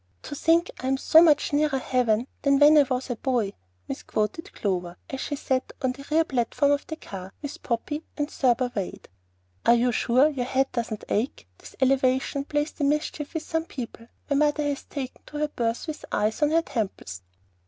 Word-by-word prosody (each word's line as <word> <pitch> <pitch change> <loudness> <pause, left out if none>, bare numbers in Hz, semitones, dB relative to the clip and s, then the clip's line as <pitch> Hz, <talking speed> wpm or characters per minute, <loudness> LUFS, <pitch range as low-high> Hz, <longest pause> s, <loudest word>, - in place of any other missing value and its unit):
"To - - -7
think 330 +4 +2
I'm 265 +1 0
so 315 +4 +6
much 310 -1 +4
nearer 295 -1 +2
heaven 250 -3 +1 0.2
Than 280 -1 +4
when 295 +2 +7
I 300 - +8
was 255 0 -1
a 240 - -3
boy," 240 -6 0 0.3
misquoted 215 - -3
Clover, 180 -3 -2
as 270 - -4
she 290 - -2
sat 260 -2 -1
on 260 - +2
the 270 +2 -9
rear 320 +2 +4
platform 275 0 +1
of 285 0 0
the 315 - -4
car, 190 -10 -9
with 285 - -6
Poppy, 270 +6 -2 0.2
and 295 -1 0
Thurber 250 -3 +1
Wade. 195 -4 -5 0.5
"Are 235 - +6
you 245 +1 +2
sure 250 +4 +4
your 265 -5 -2
head 270 +1 +1
doesn't 230 -3 -3
ache? 215 - -2
This - - -13
elevation 265 +1 +2
plays 295 +1 -1
the 295 - -5
mischief 295 +1 -1
with 320 - -2
some 325 0 -2
people. 235 -5 -8 0.2
My 280 - +1
mother 300 0 +2
has 285 -1 -2
taken 265 -3 -6
to 300 - -7
her 300 0 0
berth 230 -4 -2
with 310 -2 -6
ice 215 +5 0
on 295 - +4
her 330 +1 +3
temples." 190 - -4
270 Hz, 195 wpm, -26 LUFS, 235-295 Hz, 0.5 s, I